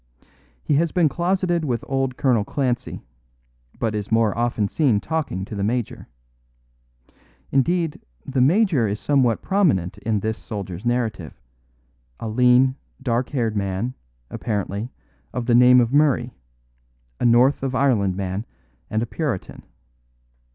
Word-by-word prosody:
He -, -, 0 dB
has 165 Hz, +1 st, +1 dB
been 175 Hz, -3 st, +3 dB
closeted 175 Hz, 0 st, 0 dB
with 125 Hz, -5 st, -2 dB
old 135 Hz, -1 st, -1 dB
Colonel 125 Hz, -6 st, +2 dB
Clancy; 125 Hz, +1 st, -2 dB, 0.7 s
but 110 Hz, -2 st, -1 dB
is 105 Hz, 0 st, -4 dB
more 115 Hz, -2 st, +2 dB
often 115 Hz, -3 st, 0 dB
seen 125 Hz, -4 st, +2 dB
talking 150 Hz, -, -3 dB
to -, -, -10 dB
the 100 Hz, -1 st, -3 dB
major. 115 Hz, +2 st, -2 dB, 1.4 s
Indeed, 165 Hz, +4 st, +1 dB, 0.2 s
the 135 Hz, -1 st, 0 dB
major 160 Hz, -, +3 dB
is 105 Hz, +1 st, -3 dB
somewhat 130 Hz, -5 st, +1 dB
prominent 120 Hz, -, +1 dB
in 105 Hz, -2 st, -1 dB
this 110 Hz, +1 st, -2 dB
soldier's 100 Hz, -1 st, -6 dB
narrative; 110 Hz, -9 st, -2 dB, 0.8 s
a -, -, -5 dB
lean, 125 Hz, +3 st, +4 dB, 0.2 s
dark 125 Hz, -2 st, -1 dB
haired 115 Hz, -6 st, -1 dB
man, 100 Hz, +4 st, -2 dB, 0.4 s
apparently, 105 Hz, +1 st, -3 dB, 0.4 s
of 125 Hz, -2 st, -3 dB
the 120 Hz, -, +2 dB
name 125 Hz, +1 st, +7 dB
of 120 Hz, +1 st, +1 dB
Murray 140 Hz, -4 st, +2 dB, 0.9 s
a -, -, 0 dB
north 125 Hz, +4 st, +4 dB
of 135 Hz, -1 st, -2 dB
Ireland 110 Hz, -9 st, +2 dB
man 95 Hz, +3 st, -4 dB, 0.4 s
and 110 Hz, +1 st, 0 dB
a -, -, -1 dB
Puritan. 135 Hz, -, -4 dB
120 Hz, 135 wpm, -22 LUFS, 105-135 Hz, 1.4 s, name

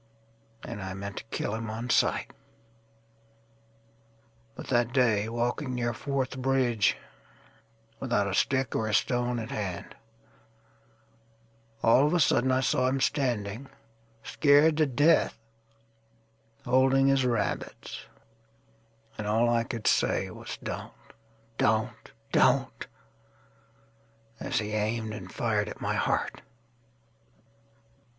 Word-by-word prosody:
And 115 Hz, -4 st, -6 dB
I 95 Hz, 0 st, -5 dB
meant 100 Hz, +1 st, -7 dB
to -, -, -5 dB
kill 110 Hz, -, -3 dB
him 115 Hz, 0 st, -4 dB
on 115 Hz, +3 st, -4 dB
sight. -, -, +2 dB, 2.2 s
But -, -, -8 dB
that 120 Hz, -2 st, +2 dB
day, 110 Hz, -5 st, +2 dB
walking 120 Hz, +3 st, -2 dB
near 120 Hz, -1 st, -1 dB
Fourth 135 Hz, +2 st, -3 dB
Bridge, 130 Hz, -5 st, +2 dB, 1.0 s
Without 120 Hz, -6 st, 0 dB
a 100 Hz, -, -2 dB
stick 130 Hz, +5 st, +1 dB
or 110 Hz, -, 0 dB
a 105 Hz, -, +1 dB
stone 125 Hz, +1 st, +1 dB
at 110 Hz, -1 st, -5 dB
hand, 95 Hz, -4 st, -4 dB, 1.9 s
All 125 Hz, +5 st, +5 dB
of 165 Hz, -, +1 dB
a -, -, +3 dB
sudden 130 Hz, -3 st, +3 dB
I 130 Hz, 0 st, +2 dB
saw 130 Hz, -1 st, +2 dB
him 135 Hz, +1 st, 0 dB
standing, 125 Hz, -4 st, -1 dB, 0.5 s
Scared 150 Hz, +1 st, +4 dB
to 155 Hz, -1 st, +3 dB
death, 145 Hz, +5 st, +3 dB, 1.3 s
holding 130 Hz, +2 st, +4 dB
his 135 Hz, -1 st, +3 dB
rabbits, 120 Hz, -4 st, -3 dB, 1.1 s
And 105 Hz, -, -3 dB
all 115 Hz, +3 st, +2 dB
I 115 Hz, -1 st, +2 dB
could 115 Hz, -3 st, -6 dB
say -, -, +2 dB
was, -, -, -8 dB
"Don't, -, -, -5 dB, 0.7 s
Don't, 110 Hz, 0 st, 0 dB, 0.2 s
Don't,"As 115 Hz, 0 st, -4 dB
he 105 Hz, -1 st, -1 dB
aimed 110 Hz, +1 st, -1 dB
and 110 Hz, -, -8 dB
fired 105 Hz, -3 st, 0 dB
at -, -, -9 dB
my -, -, -1 dB
heart. -, -, -1 dB
120 Hz, 115 wpm, -28 LUFS, 110-130 Hz, 2.2 s, All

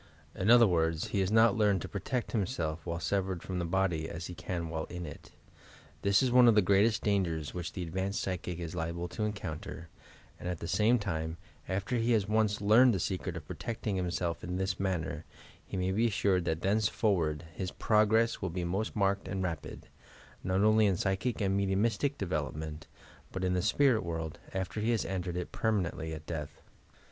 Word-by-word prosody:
In 100 Hz, -, -1 dB
other 120 Hz, 0 st, +8 dB
words, 80 Hz, -4 st, +1 dB
he 100 Hz, -, 0 dB
has 95 Hz, -1 st, +1 dB
not 110 Hz, +1 st, +5 dB
learned 105 Hz, -5 st, +2 dB
to -, -, -4 dB
pro 100 Hz, -, -5 dB
tect 125 Hz, +3 st, -2 dB
himself 85 Hz, -8 st, -2 dB
while 85 Hz, 0 st, -2 dB
severed 95 Hz, 0 st, -1 dB
from 90 Hz, -1 st, -3 dB
the 85 Hz, -, -1 dB
body 85 Hz, -3 st, 0 dB
as 85 Hz, +1 st, -6 dB
he 90 Hz, -, -6 dB
can 85 Hz, -1 st, -4 dB
while 80 Hz, 0 st, -3 dB
in 90 Hz, -1 st, -6 dB
it. 75 Hz, -, -10 dB, 0.7 s
This 100 Hz, +4 st, +4 dB
is 130 Hz, -, +2 dB
one 125 Hz, 0 st, +7 dB
of 115 Hz, -, +6 dB
the 105 Hz, -, +6 dB
greatest 100 Hz, +4 st, +3 dB
dangers 85 Hz, -8 st, 0 dB
which 90 Hz, -1 st, -5 dB
the 90 Hz, -, -4 dB
advanced 95 Hz, +4 st, -2 dB
psychic 90 Hz, -2 st, -3 dB
is 85 Hz, -2 st, -5 dB
liable 85 Hz, 0 st, -3 dB
to 105 Hz, +4 st, -2 dB
encounter, 85 Hz, -5 st, -5 dB, 0.5 s
and, 90 Hz, -, -4 dB
at 90 Hz, -, -2 dB
the 85 Hz, -, -6 dB
same 110 Hz, +7 st, +3 dB
time, 80 Hz, -6 st, -3 dB, 0.3 s
after 95 Hz, +6 st, -1 dB
he 115 Hz, +1 st, +2 dB
has 105 Hz, -3 st, +2 dB
once 105 Hz, 0 st, +1 dB
learned 115 Hz, +3 st, +6 dB
the -, -, -1 dB
secret 90 Hz, -1 st, -2 dB
of 80 Hz, -, -8 dB
pro -, -, -6 dB
tecting 110 Hz, -3 st, -3 dB
himself 85 Hz, -3 st, -2 dB
in 90 Hz, +1 st, -3 dB
this 95 Hz, -1 st, -1 dB
manner, 95 Hz, -4 st, -2 dB, 0.4 s
he -, -, -4 dB
may 90 Hz, 0 st, 0 dB
be 110 Hz, +5 st, +2 dB
assured 95 Hz, -4 st, +1 dB
that 80 Hz, -1 st, -1 dB
thenceforward 95 Hz, -6 st, +1 dB
his 90 Hz, +2 st, -3 dB
progress 110 Hz, +3 st, +2 dB
will 95 Hz, -, -1 dB
be 90 Hz, +1 st, -3 dB
most 95 Hz, +6 st, -2 dB
marked 100 Hz, -1 st, +1 dB
and 95 Hz, -1 st, -2 dB
rapid, 80 Hz, -5 st, -5 dB, 0.6 s
not 95 Hz, +1 st, +1 dB
only 110 Hz, 0 st, +5 dB
in 95 Hz, -3 st, +1 dB
psychic 100 Hz, +6 st, -1 dB
and 95 Hz, -1 st, +1 dB
mediumistic 100 Hz, +8 st, +1 dB
development, 80 Hz, -3 st, -3 dB, 0.4 s
but 95 Hz, -, -4 dB
in 90 Hz, 0 st, +1 dB
the 90 Hz, -, +1 dB
spirit 120 Hz, +4 st, +3 dB
world, 80 Hz, -2 st, -4 dB
after 95 Hz, +2 st, -3 dB
he 110 Hz, +2 st, 0 dB
has 115 Hz, -2 st, +1 dB
entered 90 Hz, -2 st, -3 dB
it 90 Hz, -, -4 dB
perma 105 Hz, -6 st, 0 dB
nently, 80 Hz, 0 st, -5 dB
at 80 Hz, 0 st, -7 dB
death. 75 Hz, -3 st, -5 dB
95 Hz, 200 wpm, -31 LUFS, 85-105 Hz, 0.7 s, other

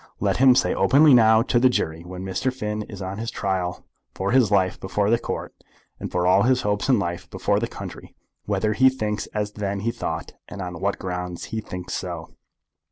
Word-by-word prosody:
Let -, -, +1 dB
him 130 Hz, -1 st, +6 dB
say -, -, +2 dB
openly, 145 Hz, +1 st, +5 dB
now, 110 Hz, -2 st, +6 dB
to 120 Hz, -, +2 dB
the 130 Hz, +1 st, +5 dB
jury, 80 Hz, -9 st, -2 dB
when 90 Hz, +1 st, -7 dB
Mr. 95 Hz, +7 st, -1 dB
Finn 105 Hz, -4 st, -4 dB
is 100 Hz, -2 st, -7 dB
on 95 Hz, +2 st, -5 dB
his 115 Hz, +1 st, -3 dB
trial 95 Hz, -4 st, -2 dB, 0.3 s
for 95 Hz, +1 st, -1 dB
his 125 Hz, -4 st, +4 dB
life 95 Hz, -3 st, +2 dB
before 100 Hz, +2 st, 0 dB
the 115 Hz, -, +3 dB
Court, -, -, -5 dB, 0.5 s
and -, -, -5 dB
for 90 Hz, 0 st, 0 dB
all 90 Hz, +2 st, +5 dB
his 125 Hz, +3 st, +2 dB
hopes 105 Hz, +4 st, -1 dB
in 130 Hz, -, +5 dB
life 90 Hz, -2 st, -3 dB
before 100 Hz, +2 st, 0 dB
the 115 Hz, -, -1 dB
country, -, -, -9 dB, 0.3 s
whether 110 Hz, 0 st, 0 dB
he 130 Hz, +4 st, +5 dB
thinks 110 Hz, -5 st, -3 dB
as 105 Hz, -1 st, -3 dB
then 100 Hz, -1 st, -3 dB
he 115 Hz, +3 st, 0 dB
thought, -, -, -5 dB
and 100 Hz, -, -9 dB
on 90 Hz, -3 st, -5 dB
what 100 Hz, +1 st, 0 dB
grounds 90 Hz, -1 st, -5 dB
he 110 Hz, -, -1 dB
thinks 90 Hz, -3 st, -7 dB
so." 85 Hz, -3 st, -5 dB
100 Hz, 210 wpm, -23 LUFS, 90-115 Hz, 0.5 s, him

